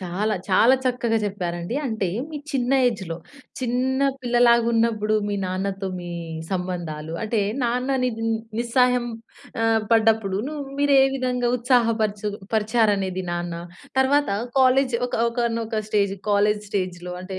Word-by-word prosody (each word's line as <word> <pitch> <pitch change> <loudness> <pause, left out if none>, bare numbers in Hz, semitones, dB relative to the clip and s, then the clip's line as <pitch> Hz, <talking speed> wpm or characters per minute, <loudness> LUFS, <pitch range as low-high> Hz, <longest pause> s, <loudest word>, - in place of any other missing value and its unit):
చాలా, 195 +4 -1
చాలా 225 +7 +5
చక్కగా 240 -3 +1
జెప్పారండి. 175 -1 -3
అంటే 220 -5 -1 0.2
మీ 310 - -5 0.2
చిన్న 255 -1 0
ఏజ్‌లో, 190 -9 -2 0.4
చిన్న 255 +2 0 0.2
పిల్లలాగున్నప్పుడు 235 -3 +3
మీ 205 - -1
నాన్నతో 190 +1 -3
మీ 175 0 -7 0.4
సంబంధాలు 175 -4 -4
అంటే 220 0 0 0.2
నాన్నని 255 +2 0
న్ 225 0 -1 0.3
నిస్సాయం 250 +1 +2 0.6
ఆహ్, 225 0 +3
పడ్డప్పుడు 220 -3 +3
ను 305 - -6 0.2
మీరే 285 -1 +4 0.2
విధంగా 250 -2 0
ఉత్సాహ 245 -1 +3
పరుచు 210 -1 -1 0.2
పరిచారనేది, 210 -4 +1
నాన్న. 175 0 -3 0.4
తరువాత 285 +2 +3 0.3
కాలేజి 260 -1 +4
ఒక 245 - -6
ఒకానొక 230 -2 -1
స్టేజ్ 200 -2 +1 0.2
కాలేజి 205 +1 +2
స్టేజ్‌లో 180 -3 -3
అంటే 185 0 -6
225 Hz, 120 wpm, -23 LUFS, 195-245 Hz, 0.6 s, చాలా